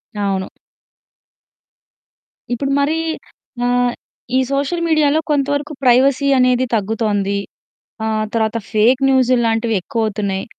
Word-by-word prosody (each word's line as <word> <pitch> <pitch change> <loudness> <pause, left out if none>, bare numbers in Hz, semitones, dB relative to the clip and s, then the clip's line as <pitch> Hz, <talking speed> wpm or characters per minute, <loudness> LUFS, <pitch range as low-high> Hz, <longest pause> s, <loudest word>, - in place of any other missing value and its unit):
అవును. 195 -2 -1 2.1
ఇప్పుడు 275 +3 -2
మరీ 305 +3 +1 0.7
ఆహ్, 245 0 +1 0.4
ఈ - - +4
సోషల్ 285 +5 -1
మీడియాలో 310 -2 +3
కొంతవరకు 285 +1 -1
ప్రైవసీ 260 +2 +4
అనేది 250 0 +3
తగ్గుతోంది. 205 -2 -1 0.7
ఆహ్, 215 -1 -1
తర్వాత 225 0 0
ఫేక్ 235 +5 +3
న్యూసుళ్ళు 255 -2 +3
లాంటివెక్కువవుతున్నాయి. 215 -3 -1
245 Hz, 90 wpm, -18 LUFS, 215-275 Hz, 2.1 s, ఈ